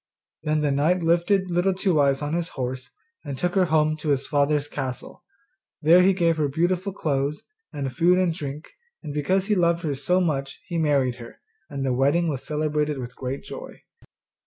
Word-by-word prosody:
Then 155 Hz, 0 st, 0 dB
the 145 Hz, -1 st, +1 dB
knight 160 Hz, +6 st, +2 dB
lifted 175 Hz, +3 st, +2 dB
Little 180 Hz, +2 st, +2 dB
Two 185 Hz, -4 st, +1 dB
eyes 140 Hz, 0 st, +2 dB
on 145 Hz, +1 st, -2 dB
his 170 Hz, 0 st, -1 dB
horse, 130 Hz, -1 st, -4 dB, 0.3 s
and 140 Hz, -3 st, -5 dB
took 175 Hz, +3 st, -1 dB
her 190 Hz, -2 st, +3 dB
home 155 Hz, -1 st, +2 dB
to 155 Hz, 0 st, -4 dB
his 140 Hz, -1 st, +1 dB
father's 145 Hz, 0 st, +1 dB
castle. 130 Hz, -3 st, -6 dB, 0.6 s
There 170 Hz, +4 st, +7 dB
he 190 Hz, +1 st, +5 dB
gave 170 Hz, -3 st, +1 dB
her 150 Hz, -2 st, +1 dB
beautiful 175 Hz, +6 st, 0 dB
clothes, 145 Hz, -5 st, -2 dB, 0.3 s
and 135 Hz, -3 st, -4 dB
food 175 Hz, +2 st, +4 dB
and 185 Hz, -3 st, +2 dB
drink, 150 Hz, -2 st, -7 dB, 0.3 s
and 150 Hz, -3 st, -6 dB
because 185 Hz, +6 st, +1 dB
he 210 Hz, -, +1 dB
loved 170 Hz, -2 st, +2 dB
her 150 Hz, -3 st, -1 dB
so 180 Hz, +7 st, +1 dB
much 140 Hz, -6 st, -2 dB
he 170 Hz, -2 st, -3 dB
married 140 Hz, -5 st, +1 dB
her, 115 Hz, -2 st, -12 dB, 0.3 s
and 140 Hz, -3 st, -4 dB
the 130 Hz, -, +1 dB
wedding 145 Hz, +7 st, +2 dB
was 135 Hz, -4 st, -3 dB
celebrated 150 Hz, -1 st, -1 dB
with 125 Hz, -1 st, -7 dB
great 130 Hz, +1 st, -5 dB
joy. -, -, -10 dB
150 Hz, 190 wpm, -24 LUFS, 140-175 Hz, 0.6 s, There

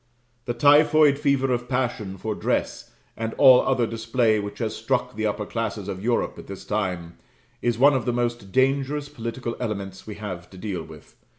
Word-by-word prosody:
The 120 Hz, -, -3 dB
typhoid 145 Hz, +2 st, +5 dB
fever 140 Hz, -3 st, +2 dB
of 120 Hz, 0 st, -3 dB
passion 120 Hz, -7 st, -2 dB
for 110 Hz, +3 st, -3 dB
dress, -, -, -2 dB, 0.3 s
and 115 Hz, 0 st, -4 dB
all 130 Hz, -3 st, +7 dB
other 130 Hz, -3 st, +1 dB
display, 115 Hz, -1 st, +1 dB
which 100 Hz, 0 st, -6 dB
has 110 Hz, -2 st, -3 dB
struck -, -, -1 dB
the 110 Hz, 0 st, -1 dB
upper 105 Hz, 0 st, -2 dB
classes 110 Hz, -3 st, -4 dB
of 95 Hz, -1 st, -5 dB
Europe 120 Hz, +1 st, 0 dB
at -, -, -11 dB
this 100 Hz, -1 st, -9 dB
time, 90 Hz, -5 st, -3 dB, 0.4 s
is 120 Hz, -2 st, 0 dB
one 140 Hz, +4 st, +6 dB
of 130 Hz, -4 st, -1 dB
the 125 Hz, -, +1 dB
most 120 Hz, -4 st, -2 dB
dangerous 140 Hz, +3 st, +1 dB
political 115 Hz, -2 st, -5 dB
elements 100 Hz, -5 st, -5 dB
we 105 Hz, -, -6 dB
have 90 Hz, -5 st, -7 dB
to 95 Hz, -, -14 dB
deal 95 Hz, -3 st, -4 dB
with. 80 Hz, -2 st, -13 dB
115 Hz, 185 wpm, -24 LUFS, 100-130 Hz, 0.4 s, all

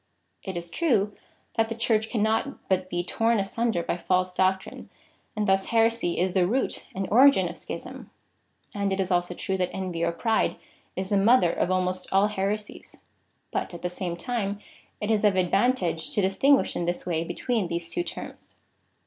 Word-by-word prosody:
It 190 Hz, -3 st, -5 dB
is 170 Hz, 0 st, -6 dB
true, 215 Hz, -, +1 dB, 0.4 s
that 225 Hz, 0 st, +2 dB
the 230 Hz, -, -3 dB
Church 220 Hz, -1 st, +1 dB
can 220 Hz, -4 st, 0 dB
not 225 Hz, +6 st, -1 dB
but 185 Hz, -1 st, 0 dB
be 175 Hz, -1 st, -1 dB
torn 225 Hz, +5 st, +1 dB
asunder 200 Hz, -1 st, -1 dB
by 170 Hz, -, -2 dB
false 185 Hz, +1 st, 0 dB
doctrine, 190 Hz, +1 st, -1 dB, 0.5 s
and 210 Hz, -1 st, -1 dB
thus 195 Hz, 0 st, +2 dB
heresy 230 Hz, -5 st, +2 dB
is 180 Hz, 0 st, +1 dB
the 180 Hz, -1 st, +3 dB
root 255 Hz, +7 st, -1 dB
and 190 Hz, 0 st, -2 dB
origin 270 Hz, +5 st, +6 dB
of -, -, -7 dB
schism, -, -, -8 dB, 0.6 s
and 200 Hz, -1 st, -1 dB
it 190 Hz, -, -1 dB
is 190 Hz, 0 st, 0 dB
also 175 Hz, 0 st, +1 dB
true 190 Hz, +2 st, -2 dB
that 180 Hz, -1 st, 0 dB
envy 180 Hz, -3 st, -3 dB
or 170 Hz, -, +2 dB
pride 220 Hz, +6 st, +1 dB, 0.4 s
is 190 Hz, 0 st, -3 dB
the 205 Hz, -, +2 dB
mother 200 Hz, -3 st, +5 dB
of -, -, 0 dB
almost 185 Hz, 0 st, -1 dB
all 195 Hz, +2 st, +4 dB
heresies, 210 Hz, +1 st, -4 dB, 0.5 s
but -, -, -3 dB
at 170 Hz, -, -10 dB
the 180 Hz, -, 0 dB
same 180 Hz, -1 st, -4 dB
time 205 Hz, 0 st, -2 dB, 0.4 s
it 210 Hz, +1 st, -1 dB
is 215 Hz, -1 st, +2 dB
of 205 Hz, -2 st, +4 dB
advantage 185 Hz, -2 st, +1 dB
to -, -, +2 dB
distinguish 265 Hz, +9 st, +3 dB
in 175 Hz, -, -1 dB
this 175 Hz, +1 st, -2 dB
way 165 Hz, -2 st, 0 dB
be 175 Hz, +1 st, -6 dB
tween 230 Hz, -7 st, 0 dB
these 170 Hz, 0 st, -4 dB
two -, -, 0 dB
terms. -, -, -8 dB
195 Hz, 190 wpm, -26 LUFS, 180-220 Hz, 0.6 s, origin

